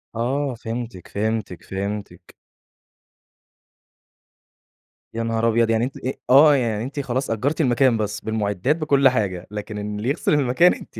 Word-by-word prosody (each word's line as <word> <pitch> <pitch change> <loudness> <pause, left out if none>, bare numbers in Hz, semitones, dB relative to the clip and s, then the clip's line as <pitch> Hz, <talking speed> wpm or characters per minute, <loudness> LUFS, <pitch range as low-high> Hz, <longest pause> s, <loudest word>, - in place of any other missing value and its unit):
آه 130 +3 -1
فهمتِك، 115 -4 -6
فهمتِك، 105 -3 -3
فهمتِك. 100 -2 -6 2.8
يا 115 0 -2
نهار 115 0 0
أبيض، 115 0 +2
يعني 115 0 +2
أنتِ 135 - -7
أ 130 - -3 0.2
آه، 145 +3 +7
يعني 115 -5 -1
أنتِ 140 +4 -5
خلاص 130 0 -2
أجرتِ 135 +9 0
المكان 125 -3 +3
بس 105 -1 -2
بالمُعِدّات 110 +4 0
بكل 140 -4 +3
حاجة، 95 -8 -2
لكن 105 0 -6
إن 105 0 -4
اللي 110 +5 -2
يغسل 140 - 0
المكان 145 +5 +4
أنتِ - - -11
115 Hz, 140 wpm, -22 LUFS, 105-135 Hz, 2.8 s, آه